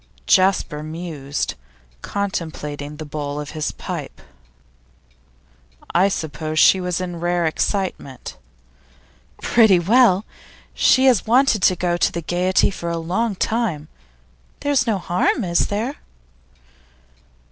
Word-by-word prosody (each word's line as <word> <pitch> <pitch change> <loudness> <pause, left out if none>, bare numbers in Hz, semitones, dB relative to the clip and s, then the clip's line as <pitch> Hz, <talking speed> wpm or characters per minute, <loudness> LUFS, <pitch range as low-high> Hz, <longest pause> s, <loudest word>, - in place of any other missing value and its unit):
Jasper 185 - +2
mused, 155 -3 -4 0.5
contemplating 150 -7 -4
the 155 - -7
bowl 145 -1 -4
of 145 -1 -6
his 155 -1 -3
pipe. - - -7 1.7
'I 185 +3 +4
suppose 155 -4 -4
she 190 +3 +6
was 180 -1 -2
in 175 -2 -5
rare 175 0 0
excitement?' 160 - -3 1.1
'Pretty 220 -5 +5
well. 205 +2 +4 0.5
She 260 +1 +4
has 250 -5 +3
wanted 245 -2 +3
to 185 - +4
go 175 -1 -1
to - - +2
the 170 - -5
Gaiety 180 +4 +1
for 170 -2 -5
a 170 - -2
long 195 +7 -1
time. 185 -9 -2 0.7
There's 285 -3 +1
no 220 -3 +1
harm, 180 +6 0
is 170 -2 +1
there? 230 +8 -3
175 Hz, 115 wpm, -21 LUFS, 155-200 Hz, 1.7 s, she